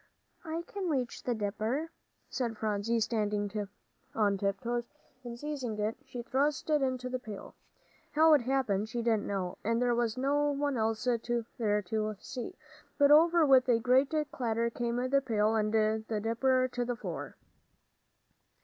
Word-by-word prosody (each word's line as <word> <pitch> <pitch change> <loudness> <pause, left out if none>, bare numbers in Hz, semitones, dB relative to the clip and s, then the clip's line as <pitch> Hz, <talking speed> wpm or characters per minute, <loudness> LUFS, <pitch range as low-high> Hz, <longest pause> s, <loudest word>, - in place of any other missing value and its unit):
"I 330 0 -4
can 390 -3 -4
reach 255 -6 -2
the 245 - -1
dipper," 220 +9 -2 0.4
said 235 -4 -2
Phronsie, 215 +2 0
standing 210 -3 -1 0.6
on 205 -2 +2
tiptoes, 230 +5 -1 0.4
and 240 -1 -7
seizing 265 -6 -4
it, 215 +1 -1
she 240 -1 -7
thrust 285 +4 0
it 300 -1 +3
into 255 -1 -1
the 255 0 -3
pail. 215 -5 -9 0.6
How 315 +1 +6
it 295 - +5
happened, 235 -5 0
she 240 0 -3
didn't 225 -3 +1
know, 190 -3 -3
and 230 +2 +1
there 245 -1 +2
was 235 -1 0
no 290 +3 +2
one 285 -1 -1
else 220 -1 0
there 245 -2 +1 0.6
to 215 +2 -2
see, 245 +1 -6 0.4
but 285 -1 +5
over 330 +2 +6
with 260 -2 +5
a 235 - +5
great 255 +4 +3 0.2
clatter 235 -1 -1
came 235 0 -2
the 275 +1 +3
pail 220 -4 +1
and 215 -1 +1
the 220 0 +1
dipper 255 +4 +2
to 245 - -1
the 245 0 -2
floor. - - -6
240 Hz, 160 wpm, -31 LUFS, 220-270 Hz, 0.6 s, How